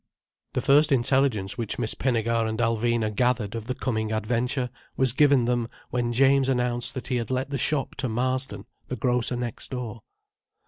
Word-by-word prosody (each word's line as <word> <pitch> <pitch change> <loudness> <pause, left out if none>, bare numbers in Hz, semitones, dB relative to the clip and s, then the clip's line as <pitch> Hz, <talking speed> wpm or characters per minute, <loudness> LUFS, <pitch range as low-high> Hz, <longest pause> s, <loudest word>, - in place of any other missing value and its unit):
The - - 0
first 145 +2 +4
intelligence 125 -5 +2
which 115 -3 -2
Miss 115 -2 0
Pinnegar 115 -2 0
and 110 - -3
Alvina 115 -1 +1
gathered 120 -3 +1
of 115 -1 -5
the 130 - -2
coming 110 -4 -2
adventure 120 +3 -1 0.3
was 130 -3 +3
given 140 -3 +4
them 120 -1 0 0.2
when 120 -1 0
James 135 +2 +4
announced 125 -2 0
that 130 - -5
he 125 - +1
had 115 - -3
let 130 +2 -2
the 140 - -2
shop 140 +2 0
to 130 -2 -1
Marsden, 130 +3 -2 0.2
the 125 - -3
grocer 125 -1 +1
next 120 -2 -5
door. 125 -3 -5
125 Hz, 175 wpm, -26 LUFS, 115-130 Hz, 0.3 s, first